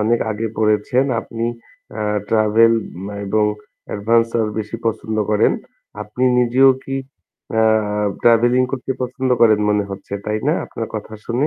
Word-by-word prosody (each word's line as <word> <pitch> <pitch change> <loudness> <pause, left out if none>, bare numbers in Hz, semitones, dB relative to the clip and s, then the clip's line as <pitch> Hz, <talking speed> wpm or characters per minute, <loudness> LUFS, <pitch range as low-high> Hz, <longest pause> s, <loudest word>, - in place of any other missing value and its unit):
অনেক 115 +2 +2
আগে 110 +1 -2
পড়েছেন। 110 +4 +2 0.2
আপনি 115 0 -5 0.5
অ্যা 110 - -4 0.2
ট্রাভেল 110 +1 +4 0.5
এবং 105 +2 +2 0.5
এডভেঞ্চার 115 +2 +1
বেশি 105 +1 -4
পছন্দ 110 -1 -2
করেন। 105 - +3 0.5
আপনি 105 +4 -6 0.2
নিজেও 125 +2 +5
কি 135 - -3 0.6
অ্যা 110 0 +3 0.6
ট্রাভেলিং 120 +2 +4
করতে 130 0 -2
পছন্দ 130 +1 -2
করেন 110 -2 +6
মনে 105 -1 +2
হচ্ছে, 100 0 -9
তাই 105 0 -1
না? - - +4
আপনার - - -6
কথা 110 - -6
শুনে। 125 +5 0
115 Hz, 135 wpm, -19 LUFS, 105-120 Hz, 0.6 s, করেন